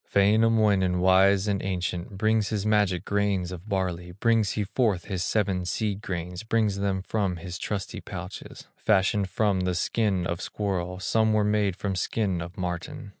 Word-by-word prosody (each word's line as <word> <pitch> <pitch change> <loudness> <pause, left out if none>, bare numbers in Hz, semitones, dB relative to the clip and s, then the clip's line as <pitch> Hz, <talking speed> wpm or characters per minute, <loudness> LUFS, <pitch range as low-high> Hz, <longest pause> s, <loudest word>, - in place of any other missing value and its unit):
Wainamoinen, 105 -3 +4
wise 95 +2 +4
and 100 -2 0
ancient, 90 0 -3
Brings 110 0 +2
his 105 -2 -2
magic 105 -4 +2
grains 100 -3 0
of 90 +4 -9
barley, 90 -3 -2
Brings 110 +1 +2
he 105 - -1
forth 100 -3 0
his 95 -3 -2
seven 95 -2 0
seed 100 +3 -2
grains, 90 -2 -4
Brings 110 -3 +1
them 100 -1 -1
from 100 -3 -1
his 90 +1 -7
trusty 100 -2 -4
pouches, - - -8
Fashioned 100 -1 +2
from 100 -1 +1
the 90 -1 0
skin 95 0 0
of 85 0 -3
squirrel, 90 -3 -3
Some 110 +3 +2
were 105 -1 +3
made 105 -2 +1
from 100 0 -3
skin 95 -1 -1
of 85 +4 -8
marten. 95 - -4
100 Hz, 165 wpm, -26 LUFS, 90-105 Hz, -, Wainamoinen